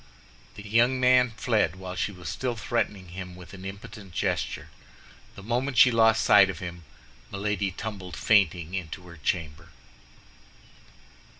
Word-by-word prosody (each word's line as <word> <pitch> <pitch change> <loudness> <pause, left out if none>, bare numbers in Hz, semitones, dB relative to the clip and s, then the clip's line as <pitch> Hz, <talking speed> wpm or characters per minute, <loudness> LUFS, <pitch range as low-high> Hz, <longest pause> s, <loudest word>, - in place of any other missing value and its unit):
The 100 0 -10
young 120 +4 +3
man 125 0 +5
fled 105 -9 +1
while 95 -1 -7
she 90 +3 -1
was 90 -4 -10
still 120 - -2
threatening 105 -4 -2
him 90 0 -8
with 90 +1 -13
an 95 -1 -10
impotent 100 0 -9
gesture. - - -2 0.7
The 100 - -11
moment 125 +4 -1
she 125 - +8
lost 110 -1 +4
sight 95 - +6
of 95 - -4
him, 85 -1 -8 0.5
Milady 100 0 -1
tumbled 95 -2 -7
fainting 90 -5 +2
into 90 -2 -5
her 85 -1 -12
chamber. 75 0 -3
100 Hz, 140 wpm, -27 LUFS, 90-115 Hz, 0.7 s, she